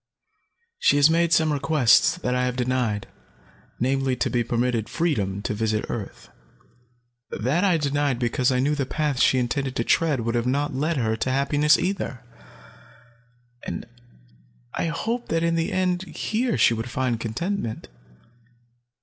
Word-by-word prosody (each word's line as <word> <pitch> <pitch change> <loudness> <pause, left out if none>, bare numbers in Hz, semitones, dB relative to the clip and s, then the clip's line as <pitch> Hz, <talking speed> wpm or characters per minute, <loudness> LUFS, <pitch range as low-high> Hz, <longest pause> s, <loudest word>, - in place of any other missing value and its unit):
She - - +4
has 145 +2 +6
made 170 0 +2
some 160 -2 +3
requests 140 -2 +3
that 125 -8 -2
I 125 0 +1
have 125 -1 -2
denied, 125 -4 -1 0.7
namely, 130 +1 +1
to - - -1
be 120 -2 +1
permitted 120 -1 -1
freedom 105 - -1
to - - -2
visit 110 0 -1
earth. 105 -4 -7 1.0
That 140 - 0
I 185 -4 +3
denied 145 -3 0
because 125 +1 +1
I 130 - +1
knew 140 +4 +1
the 140 -3 -2
paths 150 -4 -1
she 130 - +4
intended 130 +2 -1
to 115 - 0
tread 150 -1 +1
would 115 +1 -2
not 145 +3 0
have - - -7
led 155 +2 0
her 110 -3 0
to 130 - -2
happiness 145 +3 +3
either, 175 -9 -3 1.4
and - - -5 0.9
I - - -1
hoped 230 +9 -3
that 165 0 0
in 170 0 +1
the 165 0 -1
end, 185 -1 0
here 230 +4 -2
she - - +4
would 115 +2 -4
find 120 -2 -1
contentment. 115 - -3
135 Hz, 155 wpm, -24 LUFS, 120-160 Hz, 1.4 s, has